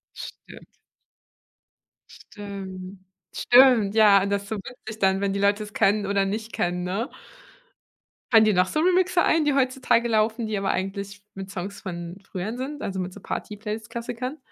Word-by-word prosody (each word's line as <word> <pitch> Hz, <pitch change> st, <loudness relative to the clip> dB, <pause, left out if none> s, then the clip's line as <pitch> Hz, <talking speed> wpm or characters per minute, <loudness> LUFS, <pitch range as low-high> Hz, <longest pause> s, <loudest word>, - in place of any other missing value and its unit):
Stimmt. -, -, -11 dB, 1.3 s
Stimmt, 195 Hz, -2 st, -9 dB, 0.4 s
stimmt, 245 Hz, -5 st, +5 dB
ja, 210 Hz, -3 st, +6 dB
und 200 Hz, -, -2 dB
das 200 Hz, 0 st, 0 dB
ist 200 Hz, -, -13 dB
so 220 Hz, -, -2 dB
witzig 220 Hz, 0 st, -9 dB
dann, 195 Hz, -1 st, +2 dB
wenn 200 Hz, -1 st, 0 dB
die 200 Hz, -, -1 dB
Leute 200 Hz, +1 st, +2 dB
es 210 Hz, -1 st, -9 dB
kennen 200 Hz, 0 st, +2 dB
oder 200 Hz, 0 st, +1 dB
nicht 215 Hz, +3 st, -4 dB
kennen, 175 Hz, 0 st, -1 dB
ne? 210 Hz, +10 st, -2 dB, 1.2 s
Fallen 220 Hz, -1 st, +8 dB
dir 215 Hz, -, +4 dB
noch 180 Hz, 0 st, +4 dB
so 310 Hz, -, 0 dB
Remixe 365 Hz, 0 st, +3 dB
ein, 315 Hz, -2 st, +2 dB
die 290 Hz, -, +3 dB
heutzutage 255 Hz, -3 st, +2 dB
laufen, 220 Hz, +1 st, +1 dB
die 215 Hz, -2 st, -2 dB
aber 195 Hz, 0 st, -1 dB
eigentlich 200 Hz, +1 st, -4 dB
mit 195 Hz, 0 st, -7 dB
Songs 195 Hz, +1 st, -6 dB
von 175 Hz, 0 st, -6 dB
früher 195 Hz, +4 st, -4 dB
sind, 285 Hz, +3 st, -5 dB
also 190 Hz, -1 st, -3 dB
mit 180 Hz, 0 st, -5 dB
so 205 Hz, -, -11 dB
Party-Playlist-Klassikern? 230 Hz, +7 st, -5 dB
205 Hz, 165 wpm, -25 LUFS, 195-235 Hz, 1.3 s, Fallen